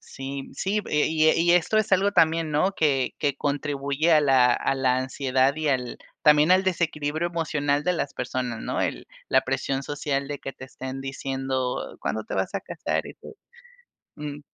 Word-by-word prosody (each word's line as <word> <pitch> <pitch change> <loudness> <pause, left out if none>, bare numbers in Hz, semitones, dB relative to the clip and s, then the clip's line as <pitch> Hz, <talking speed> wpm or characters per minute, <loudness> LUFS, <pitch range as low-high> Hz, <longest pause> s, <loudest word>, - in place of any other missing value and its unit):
sí, 135 0 -7
sí, 205 +2 -1
y 150 - 0
e - - +3
y 160 0 +3
e - - +1
y 170 - +3
esto 180 +5 +2
es 215 -1 0
algo 195 +2 +4
también, 160 -2 +3
¿no? 155 +6 +2
Que 140 -8 +1
que 140 -2 0
contribuye 145 +2 0
a 155 - +6
la 130 -4 +4
a 135 - 0
la 130 -1 +2
ansiedad 130 +1 +1
y 155 0 -2
al, 125 -3 -1 0.3
también 150 +2 +5
al 185 +1 +5
desequilibrio 160 -2 -1
emocional 150 -3 -1
de 180 - +2
las 150 -5 -3
personas, 125 -2 -3
¿no? - - -2
El - - -2 0.2
la 130 - +4
presión 135 +1 -2
social, 140 -1 -2
de 145 0 -5
que 135 - -6
te 130 - -10
estén 130 0 -7
diciendo: 135 -1 -3
"¿Cuándo - - -3
te - - -5
vas - - -1
a - - -3
casar?" - - -3
y - - -10
tú, 440 - -13 0.8
mm. 150 -1 -6
145 Hz, 195 wpm, -25 LUFS, 135-160 Hz, 0.8 s, a